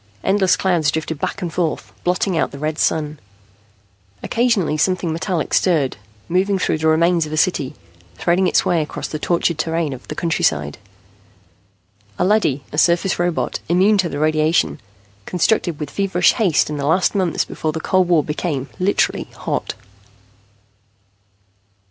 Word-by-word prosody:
Endless 190 -2 +3
clouds 175 -6 +1
drifted 160 0 -3
back 200 - -3
and 170 -2 -4
forth, 170 -3 -2
blotting 180 +1 0
out 160 - +1
the 140 - -10
red 155 +2 -3
Sun. 150 -2 0 1.0
Occasionally 230 -10 +1
something 170 +1 0
metallic 170 0 -2
stirred, 155 -8 +2 0.3
moving 190 +3 +1
through 170 -4 0
the 160 - +1
remains 165 +1 +3
of - - -9
a 155 - -3
city, 145 -5 0 0.4
threading 175 - +1
its - - +2
way 170 -2 +2
across 150 - -5
the 155 - -5
tortured 170 -1 0
terrain 165 -2 -1
of 130 - -11
the 150 - -6
countryside. 75 - 0 1.4
A 180 - +1
leady, 185 -10 +2
a 150 - 0
surface 175 +2 +2
robot, 175 -1 -1
immune 195 +4 +4
to 180 -3 +1
radiation, 155 0 +1 0.5
constructed 180 -2 0
with 150 -3 -5
feverish 195 -1 +2
haste 185 - +1
in 150 - -3
the 140 0 -2
last 180 +4 +2
months 185 -5 0
before 155 - -3
the 160 - -4
cold 185 +2 +2
war 170 -4 +3
became 150 -3 -3
literally 190 +2 +1
hot. - - -3
170 Hz, 150 wpm, -19 LUFS, 155-185 Hz, 1.4 s, immune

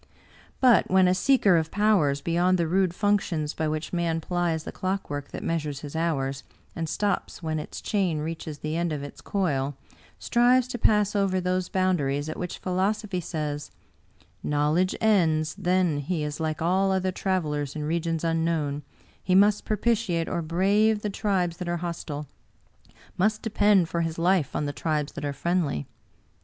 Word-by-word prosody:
But 250 -3 +5
when 190 0 +5
a 180 - +4
seeker 195 -2 +4
of 160 -1 0
powers 190 -10 +2
beyond 175 +3 +2
the 170 - +1
rude 185 0 +1
functions 190 -8 0
by 155 - -2
which 155 +3 -3
man 170 -2 0
plies 170 -1 -1
the - - -6
clockwork 185 -7 -3
that - - -7
measures 150 -4 -2
his 145 0 -8
hours, 140 -5 -1 0.3
and 165 -1 -3
stops 205 -2 -2
when 155 -1 -1
its 150 - -7
chain 190 -7 0
reaches 155 0 -5
the 155 +2 -4
end 170 0 0
of 145 -2 -3
its 145 - -9
coil, 145 -8 -1 0.4
strives 245 +1 +3
to 245 - -4
pass 210 -1 +3
over 195 -2 +2
those 180 0 -1
boundaries 150 -7 0
at 155 - -5
which 180 -1 -4
philosophy 190 +1 -1
says, 150 -3 -4 0.4
* - - -36 0.3
Knowledge 150 +5 +1
ends 160 -8 +2
— - - -30
then, 180 -5 +2
he 155 +2 -2
is 150 +1 -4
like 155 0 -2
all 190 +3 +2
other 190 0 +1
travelers 155 -7 -2
in 150 - -3
regions 165 +1 -1
unknown; 165 -3 0 0.4
he 185 - +2
must 205 +2 +4
propitiate 210 -6 0
or 170 - -2
brave 200 +6 +2
the 210 - -1
tribes 185 -5 0
that 180 -1 -4
are 175 - 0
hostile 165 -4 -5 0.5
— - - -27
must 215 +3 +1
depend 205 -4 +3
for 170 +1 -1
his 165 -1 -2
life 175 -3 +1
on 150 - 0
the 145 - -3
tribes 150 -1 -1
that - - -7
are 145 - -1
friendly. 155 - -1
170 Hz, 175 wpm, -26 LUFS, 155-190 Hz, 0.5 s, But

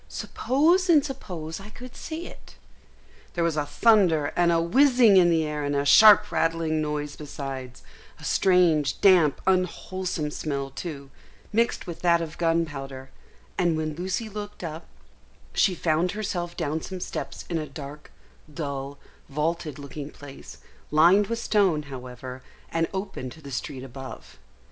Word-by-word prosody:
Suppose 340 +8 +1
and 305 -4 +5
suppose 180 - -6
I 200 +2 -10
could 245 +3 -11
see 330 +2 -6
it." - - -13 0.8
There 170 - +1
was 165 -2 +1
a 150 -1 -1
thunder 180 -11 +3
and 175 -1 +3
a 165 - +3
whizzing 245 +4 +5
in 180 -2 +6
the 165 -2 +2
air 150 -1 -3
and 145 0 -1
a 140 0 0
sharp 210 +6 +7
rattling 165 -1 0
noise 150 -1 -3
besides; 135 -4 -7 0.4
a - - -14
strange, 170 -6 +3
damp, 180 -7 +5
unwholesome 185 -3 -1
smell 140 -3 -3
too, 140 -2 -7 0.4
mixed 230 +2 +1
with 170 - -7
that 170 -1 +4
of 165 -2 -6
gunpowder; 145 -6 -2 0.5
and 170 -3 +2
when 155 -1 -2
Lucy 185 +7 -3
looked 210 -2 -7
up, 160 0 -6 0.7
she 195 -4 +3
found 170 +2 +1
herself 175 -5 -4
down 160 -1 -2
some 185 +2 -6
steps - - -5
in 165 - -1
a 155 - -5
dark, 145 +1 -9 0.4
dull, 140 -2 -5 0.3
vaulted 155 +1 -2
looking 145 0 -7
place, 140 -2 -12 0.3
lined 175 +7 +5
with 230 - -2
stone, 195 -9 +2
however, 130 -1 -8 0.3
and 165 0 +1
open 190 -9 -5
to 140 - -13
the 140 -3 -10
street 130 0 -5
above. 135 0 -10
165 Hz, 150 wpm, -26 LUFS, 145-190 Hz, 0.8 s, sharp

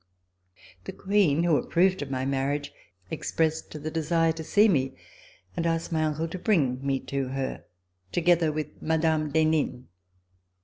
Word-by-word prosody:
The - - -6
Queen, 190 -6 +2
who 170 -4 +3
approved 185 +7 +2
of 145 - -5
my 130 -1 -2
marriage, 140 +1 -1 0.4
ex - - -4
pressed 160 -1 0
the 155 - -3
desire 165 +1 +1
to 160 0 -6
see 210 +7 +4
me 135 -8 +1 0.6
and - - -1
asked 165 +1 -1
my 160 -1 +1
uncle 155 +2 -1
to 185 - -6
bring 140 - +1
me 135 -1 0
to 135 -1 -3
her, 135 0 -4 0.5
together 170 -2 +3
with 150 -1 -5
Mme. 160 -1 +1
d'Henin. 155 -5 +1
155 Hz, 150 wpm, -27 LUFS, 140-165 Hz, 0.6 s, see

